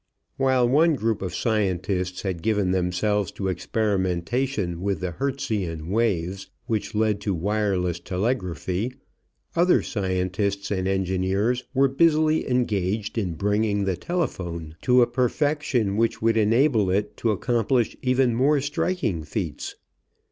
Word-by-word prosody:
While 130 Hz, -2 st, +3 dB
one 155 Hz, +5 st, +4 dB
group 115 Hz, -4 st, -1 dB
of 90 Hz, -2 st, -4 dB
scientists 95 Hz, -4 st, -1 dB
had 95 Hz, -4 st, -3 dB
given 105 Hz, -3 st, +1 dB
themselves 95 Hz, +2 st, 0 dB
to 95 Hz, -1 st, -2 dB
experimentation 95 Hz, +1 st, -1 dB
with 100 Hz, -3 st, -1 dB
the 90 Hz, 0 st, -3 dB
Hertzian 95 Hz, -, -3 dB
waves 95 Hz, -4 st, -1 dB, 0.2 s
which 115 Hz, -1 st, -2 dB
led 105 Hz, -1 st, +1 dB
to 100 Hz, -2 st, -1 dB
wireless 95 Hz, -2 st, 0 dB
telegraphy, 95 Hz, +2 st, -2 dB, 0.6 s
other 175 Hz, +2 st, +4 dB
scientists 100 Hz, 0 st, -2 dB
and 95 Hz, -2 st, 0 dB
engineers 95 Hz, +5 st, 0 dB
were 135 Hz, +1 st, +5 dB
busily 155 Hz, +2 st, +2 dB
engaged 105 Hz, -4 st, 0 dB
in 90 Hz, -6 st, -2 dB
bringing 105 Hz, +2 st, +1 dB
the 95 Hz, -2 st, 0 dB
telephone 85 Hz, -, -3 dB
to 125 Hz, 0 st, +5 dB
a -, -, +4 dB
perfection 125 Hz, -3 st, 0 dB
which 115 Hz, +1 st, +1 dB
would 115 Hz, 0 st, +2 dB
enable 115 Hz, -1 st, +3 dB
it 100 Hz, +3 st, 0 dB
to 115 Hz, -, 0 dB
accomplish 120 Hz, +2 st, +1 dB
even 130 Hz, -1 st, +2 dB
more 140 Hz, +5 st, +3 dB
striking 145 Hz, -, -1 dB
feats. 75 Hz, -, -4 dB
105 Hz, 125 wpm, -24 LUFS, 95-125 Hz, 0.6 s, were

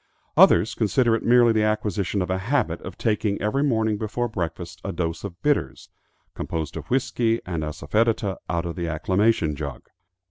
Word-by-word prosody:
Others 90 Hz, +7 st, +6 dB
consider 115 Hz, +2 st, +2 dB
it -, -, -2 dB
merely 120 Hz, 0 st, +5 dB
the 110 Hz, -, +2 dB
acquisition 105 Hz, -2 st, 0 dB
of 90 Hz, -, -3 dB
a 95 Hz, -, 0 dB
habit 100 Hz, -, 0 dB
of 90 Hz, 0 st, -8 dB
taking 105 Hz, -2 st, 0 dB
every 105 Hz, +7 st, 0 dB
morning 110 Hz, -6 st, +1 dB
before 115 Hz, +3 st, -2 dB
breakfast 90 Hz, -8 st, -5 dB
a 100 Hz, -, -3 dB
dose 85 Hz, -2 st, -3 dB
of 95 Hz, -3 st, -7 dB
bitters, 145 Hz, -, 0 dB, 0.4 s
composed 80 Hz, -2 st, -4 dB
of -, -, -7 dB
whiskey 120 Hz, -3 st, +1 dB
and 85 Hz, -3 st, -3 dB
assafoetida, 100 Hz, +6 st, 0 dB
out 85 Hz, 0 st, -1 dB
of 85 Hz, -, -4 dB
the 85 Hz, -2 st, -3 dB
acclimation 90 Hz, 0 st, +1 dB
jug. 70 Hz, -2 st, -6 dB
105 Hz, 170 wpm, -24 LUFS, 85-115 Hz, 0.4 s, Others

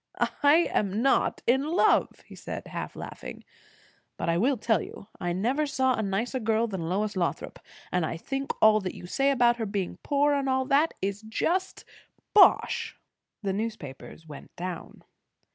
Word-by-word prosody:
"I 305 Hz, +4 st, +3 dB
am 205 Hz, +3 st, 0 dB
not 270 Hz, -, +2 dB
in 260 Hz, +3 st, +3 dB
love," 320 Hz, +5 st, +2 dB
he -, -, -14 dB
said, -, -, -7 dB
half -, -, -6 dB
laughing. -, -, -8 dB, 0.7 s
"But -, -, -2 dB
I 170 Hz, -, +2 dB
will 260 Hz, +5 st, +2 dB
tell 220 Hz, -3 st, +1 dB
you, 200 Hz, -, -10 dB
I 175 Hz, -1 st, -2 dB
never 250 Hz, +12 st, 0 dB
saw 260 Hz, -2 st, +1 dB
a 225 Hz, -, -1 dB
nicer 220 Hz, +6 st, -2 dB
girl 225 Hz, 0 st, +1 dB
than 190 Hz, -7 st, -4 dB
Lois 205 Hz, +3 st, -1 dB
Lothrop. 175 Hz, -2 st, -2 dB, 0.3 s
And 180 Hz, -2 st, +1 dB
I 160 Hz, +1 st, -3 dB
think 270 Hz, +9 st, -3 dB
all 215 Hz, 0 st, +7 dB
that 185 Hz, -3 st, -5 dB
you -, -, -10 dB
say 275 Hz, +10 st, +1 dB
about 240 Hz, -3 st, +3 dB
her 225 Hz, -, -2 dB
being 200 Hz, -2 st, -3 dB
poor, 290 Hz, 0 st, +2 dB
and 275 Hz, -1 st, 0 dB
all 260 Hz, 0 st, +1 dB
that, 285 Hz, +5 st, +2 dB
is 200 Hz, +1 st, -2 dB
just 340 Hz, +12 st, -2 dB, 0.5 s
bosh." 420 Hz, -, +4 dB, 0.5 s
The 195 Hz, -1 st, -1 dB
newspapers 175 Hz, -, -6 dB
went 150 Hz, -3 st, -12 dB
down. 180 Hz, -1 st, -7 dB
220 Hz, 170 wpm, -27 LUFS, 190-270 Hz, 0.7 s, all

